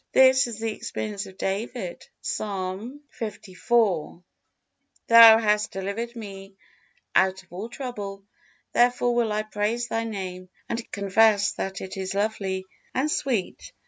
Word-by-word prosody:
This 260 -1 +6
is 230 -3 -6
the 225 0 -2
experience 205 -2 -5
of 190 - -14
David, 195 -1 -4
Psalm 205 +7 -4 0.2
liv: 215 -3 -4 1.7
"Thou 230 -1 +10
hast 210 -1 +1
delivered 200 +5 -4
me 195 -3 -9 0.6
out 190 0 +3
of 175 - -21
all 200 +6 -5
trouble, 205 -7 -6 0.5
therefore 245 0 +3
will 235 -2 +1
I 210 0 0
praise 215 +3 -2
Thy 225 0 -1
Name 185 -4 -6 0.2
and 230 0 -4
confess 200 +1 +3
that 190 -1 -4
it 190 +1 -7
is 190 0 -3
lovely 195 -2 -1 0.3
and 285 +4 +1
sweet." 240 -12 -2
210 Hz, 130 wpm, -25 LUFS, 195-230 Hz, 1.7 s, Thou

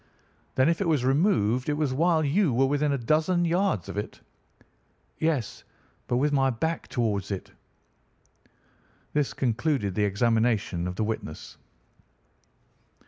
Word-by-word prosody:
"'Then 130 +2 +4
if 170 +3 +1
it 195 - 0
was 150 -6 +1
removed 135 - +2
it 145 - 0
was 150 -4 0
while 160 +2 +2
you 165 +3 +2
were 130 +3 +3
within 145 +2 +1
a 140 - +1
dozen 160 +8 +1
yards 175 - 0
of - - -7
it?' 105 - -5 1.0
"'Yes, 155 -8 -1 0.4
but 120 - +1
with 145 +3 +1
my 135 -1 +3
back 160 +7 -2
towards 105 -5 -1
it.' 100 -3 -5 1.6
"This 150 -2 +1
concluded 125 - 0
the 105 +2 +1
examination 110 -3 +1
of 90 - -4
the 110 - -1
witness." 105 -8 -5
135 Hz, 140 wpm, -26 LUFS, 110-155 Hz, 1.6 s, Then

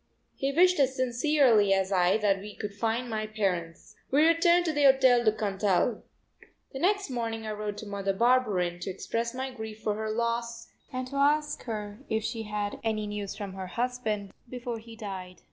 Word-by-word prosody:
He 275 +1 -1
wished 360 +4 +4
as 265 -1 +3
sincerely 250 -5 +3
as 190 0 0
I 185 +1 +3
that 205 -3 +2
we 205 +2 -9
could 205 -2 -5
find 225 +4 -1
my 215 -2 -3
parents. 180 -6 -3
We 295 +4 +4
returned 340 +1 +4
to 320 - 0
the 290 -1 +3
Hotel 260 -3 +6
du 215 - +5
Cantal. 205 +1 0 0.7
The 265 - -5
next 395 -1 +1
morning 225 -2 -3
I 215 - -3
wrote 210 -1 -4
to - - -7
Mother 200 -1 -2
Barberin 200 -6 +2
to 185 - -5
express 230 +5 -3
my 260 +1 -3
grief 220 -2 -8
for 215 - +1
her 220 +1 -3
loss 235 +1 -2 0.2
and 255 0 -3
to 280 - -5
ask 295 +1 +2
her 210 -2 -5
if 220 0 0
she 225 +1 -3
had 210 -1 -3
had - - -10
any 215 -1 -1
news 205 -1 -4
from 200 -2 -6
her 190 -1 -6
husband 220 -3 -2 0.2
before 245 -2 -5
he 225 +1 -12
died. 190 -4 -7
220 Hz, 195 wpm, -28 LUFS, 205-255 Hz, 0.7 s, Hotel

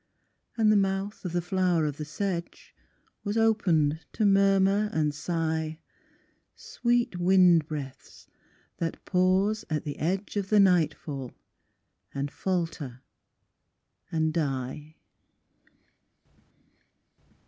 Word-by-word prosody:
And 220 -2 +4
the - - +4
mouth 195 +1 -1
of 180 - -2
the 175 0 -1
flower 175 -3 +1
of 145 -1 -3
the 150 - -5
sedge 170 +3 -5 0.5
Was 205 +1 -2
opened 165 -9 +2
to 215 - 0
murmur 195 +1 +3
and 150 -6 0
sigh, 160 0 -2 0.8
"Sweet 240 -5 -1
wind 175 -3 +5
breaths 145 -4 -8 0.5
that 165 - -4
pause 190 +4 +2
at 155 -2 -1
the 145 - -6
edge 190 +6 -2
Of 195 -1 -2
the 210 - +4
nightfall, 155 -8 +1 0.8
and 140 +1 -2
falter, 165 -9 -3 1.1
and 160 -2 0
die." 145 0 -3
175 Hz, 105 wpm, -27 LUFS, 155-195 Hz, 1.1 s, wind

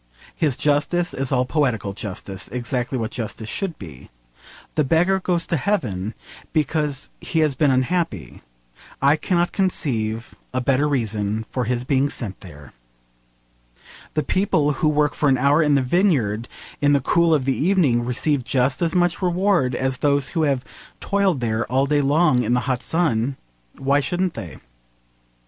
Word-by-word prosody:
His 150 -6 0
justice 150 +4 +1
is 135 -1 -2
all 125 -1 +2
poetical 125 -9 0
justice, 100 -3 -6
exactly 125 +1 -2
what 115 -2 -3
justice 110 -1 -5
should 190 - -3
be. 80 -10 -11 0.6
The 155 - +2
beggar 175 +7 +2
goes 175 -3 0
to 170 - 0
heaven 115 - -2 0.4
because 150 -3 -1
he 160 - -1
has 155 -2 +2
been 145 +2 +2
unhappy. 130 - -1 0.6
I 140 +2 +4
cannot 175 +2 0
conceive 115 - -1 0.2
a - - +2
better 135 +3 +2
reason 110 -4 -1
for 125 -2 -1
his 120 +1 -1
being 135 +1 +1
sent 105 -9 -5
there. 75 -7 -13 1.4
The 155 - +1
people 185 -6 +1
who 150 +2 +1
work 150 -1 +2
for 150 - +1
an 130 - +3
hour 140 +5 +3
in 150 -2 +3
the 135 - +2
vineyard 125 - +1 0.3
in 145 0 +4
the 140 - +4
cool 170 +5 +2
of 145 -5 +2
the 135 - +1
evening 155 -9 +2
receive 130 +3 0
just 130 +4 0
as 170 0 0
much 175 0 +1
reward 180 -7 +1
as 130 0 -1
those 140 -1 +1
who 165 - -1
have 140 -4 0 0.3
toiled 195 -8 +1
there 115 0 -1
all 135 +2 +3
day 145 +1 +2
long 140 -2 +3
in 120 +1 +1
the 125 - +1
hot 125 +1 -1
sun. 135 -6 0 0.4
Why 140 +1 +2
shouldn't 175 +5 -1
they? 85 - -8
140 Hz, 160 wpm, -22 LUFS, 120-160 Hz, 1.4 s, I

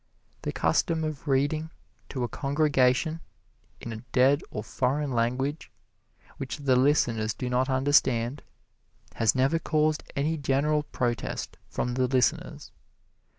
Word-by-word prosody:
The - - -3
custom 165 -3 +1
of 155 -1 -5
reading 145 +4 +1 0.4
to 130 -3 -3
a - - 0
congregation 145 +2 +1 0.6
in 115 - -6
a 110 - -7
dead 135 +3 +4
or 105 - -5
foreign 135 +5 -1
language, 125 +5 -1 0.7
which 135 - -5
the 140 -3 +2
listeners 125 -5 +2
do 125 -1 -4
not 130 +2 +1
understand, 130 -1 +2 0.8
has 115 +1 +3
never 135 +6 +2
caused 155 -1 +1
any 155 +3 0
general 145 +2 +1
protest 120 -5 -3
from 125 - -2
the 130 0 +1
listeners. 130 0 0
135 Hz, 125 wpm, -27 LUFS, 125-150 Hz, 0.8 s, dead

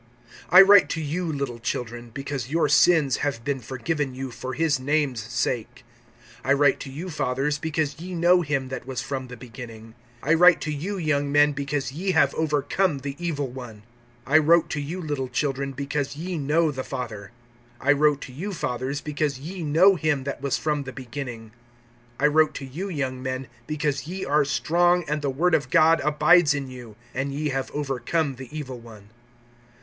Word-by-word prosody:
(12)I 190 +2 +9
write 200 -1 +7
to 165 - -2
you, 160 +4 -2
little 140 -5 -4
children, 120 0 -4
because 135 0 -5
your 160 +1 +2
sins 150 -2 +4
have 135 -6 -2
been 140 -2 -1
forgiven 135 +3 -3
you 130 0 -5
for 125 +2 -6
his 150 -2 +1
name's 140 -2 0
sake. 120 +2 -3 0.6
(13)I 140 +1 +3
write 140 -1 +3
to - - -7
you, 165 +7 -6
fathers, 135 +1 -1
because 155 -1 -2
ye 180 +2 -6
know 175 +2 +4
him 140 -4 -2
that 130 -1 -6
was 130 -2 -4
from 130 -2 -4
the 125 0 -10
beginning. 115 -2 -10 0.3
I 155 - +3
write 180 +1 +6
to 155 - -3
you, 185 +8 -4
young 145 -4 0
men, 145 +1 +5
because 140 -2 -3
ye 185 +7 -2
have - - +4
overcome 150 +2 0
the 140 0 -5
evil 145 -5 -1
one. 120 -4 -10 0.4
I 155 +4 +5
wrote 165 +2 +4
to 150 - -2
you, 160 +6 -5
little 145 -6 -3
children, 135 +2 -2
because 140 +1 -3
ye 175 +4 -4
know 155 +2 +1
the 130 -2 -5
Father. 115 -7 -6 0.5
(14)I 140 +1 +2
wrote 150 -1 +3
to 130 - -9
you, 195 +9 -5
fathers, 130 -2 -3
because 150 -2 -2
ye 170 +7 -7
know 165 +6 +5
him 150 -4 0
that 140 -1 -5
was 140 -1 0
from 150 -2 -1
the 135 -1 -7
beginning. 125 -4 -7 0.7
I 140 - +2
wrote 155 0 +3
to 135 - -5
you, 165 +10 -5
young 130 -6 -3
men, 130 0 -3 0.2
because 150 -1 -2
ye 185 +3 -4
are 145 +1 +2
strong, 175 +7 +2
and 150 +1 -1
the 145 - -1
word 165 +7 +1
of 135 -5 +2
God 160 +4 +5
abides 150 +1 +4
in 135 -2 -4
you, 120 -4 -10 0.2
and 135 +2 -2
ye 150 +2 -2
have 135 -1 -2
overcome 145 +1 -2
the 130 -1 -9
evil 135 -5 -6
one. 110 -3 -14
145 Hz, 190 wpm, -25 LUFS, 130-155 Hz, 0.7 s, 12)I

